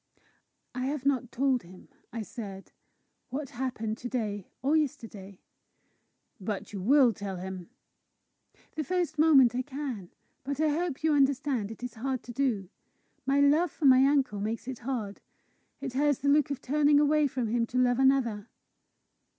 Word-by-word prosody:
"I 255 +1 -2
have 280 -1 -3
not 255 -4 +1
told 265 -1 +1
him," 180 +2 -15 0.2
I 230 -1 -4
said, 200 -4 -8 0.6
"what 275 +2 -4
happened 235 -3 -3
to 245 - -5
day 210 -6 -3 0.2
or 285 +4 +2
yesterday." 215 - -3 1.0
"But 205 +1 -5
you 195 - -4
will 255 +3 +5
tell 200 -1 -5
him?" 185 0 -7 1.1
"The 310 - -2
first 350 -1 -2
moment 275 -6 +6
I 250 - 0
can. 260 -9 -6 0.3
But 280 +1 -4
I 310 0 +3
hope 315 -1 -2
you 315 -1 +3
understand 275 -5 +1
it 225 +2 -10
is 245 -2 -5
hard 255 +2 -3
to 245 - -9
do. 235 -7 0 0.6
My 280 +1 +3
love 305 +5 +4
for 300 - -4
my 260 -1 +7
uncle 275 -8 +1
makes 225 +3 -3
it 260 -3 -5
hard. 225 -5 -4 0.6
It 270 -3 -4
has 290 0 +2
the 280 - 0
look 290 -1 +4
of 280 -1 -4
turning 290 +1 +3
away 300 0 +3
from 250 -4 -3
him 230 +1 0
to 250 - -4
love 250 0 +3
another!" 250 -6 +2
255 Hz, 165 wpm, -29 LUFS, 220-285 Hz, 1.1 s, my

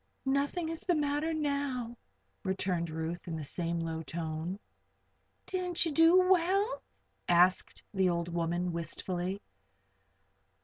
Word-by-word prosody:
"Nothing 285 +5 +1
is 330 -1 -4
the 355 - +1
matter 295 +1 0
now," 280 -6 -1 0.5
returned 185 -3 -1
Ruth, 160 +3 -4
in 165 - -3
the 155 - -4
same 170 +3 -1
low 165 -1 -3
tone. 160 +2 -4 0.9
"Didn't 360 -2 -1
you 325 - 0
do 330 +5 +6
well?" 380 +5 +3 0.5
asked 180 +1 +3
the 190 -2 +3
old 170 -1 0
woman, 175 +1 -1
wistfully. 175 +3 -3
190 Hz, 120 wpm, -31 LUFS, -, 0.9 s, do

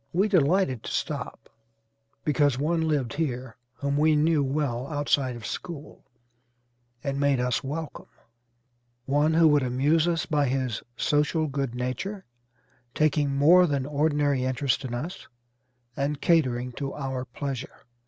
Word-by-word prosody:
We 190 +5 +3
delighted 175 - +2
to - - -6
stop - - -4 0.8
because 145 -3 +2
one 160 +3 0
lived 140 -7 0
here 130 -6 -3 0.2
whom 140 +2 -1
we 155 +1 +4
knew 150 0 +3
well 135 -2 -1
outside 145 -4 0
of 115 -3 -9
school 155 +2 -7 1.0
and 140 0 -2
made 140 -2 +2
us 125 +2 0
welcome; 150 +3 -5 1.0
one 145 +3 +2
who 165 0 +6
would 145 -1 +4
amuse 140 +6 +2
us 165 -2 0
by 145 -2 +1
his 130 -4 -1 0.2
social 150 +2 +1
good 135 -4 -3
nature, 130 - -4 0.7
taking 145 -2 +2
more 175 +6 +6
than 140 -3 -1
ordinary 145 -2 +1
interest 130 +1 0
in 120 -2 -4
us, 155 +9 -6 0.7
and 140 +1 -1
catering 125 -8 +2
to 135 +2 -5
our 135 -3 -3
pleasure." 135 -1 -6
145 Hz, 135 wpm, -26 LUFS, 130-155 Hz, 1.0 s, who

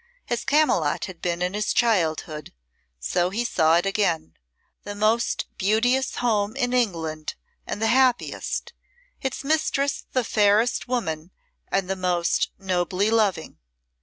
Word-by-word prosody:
As 240 0 0
Camylott 275 - +2
had 185 -4 -10
been 175 0 -1
in 180 +1 -1
his 210 +1 0
childhood 160 - 0 0.5
so 175 - 0
he 225 +5 -2
saw 160 -6 +3
it 175 - 0
again 185 - 0 0.5
the 205 - -7
most 215 +3 +1
beauteous 240 +7 +2
home 215 -2 0
in 250 -2 -1
England 165 -10 -1 0.3
and - - -4
the 225 - 0
happiest, 250 +1 +1 0.5
its 265 0 -3
mistress 285 -1 0
the 255 - +1
fairest 215 +2 +2
woman 165 -10 -2 0.4
and 195 -2 +1
the 190 - -1
most 180 -2 0
nobly 190 +2 0
loving. 205 -8 0
205 Hz, 135 wpm, -24 LUFS, 175-240 Hz, 0.5 s, saw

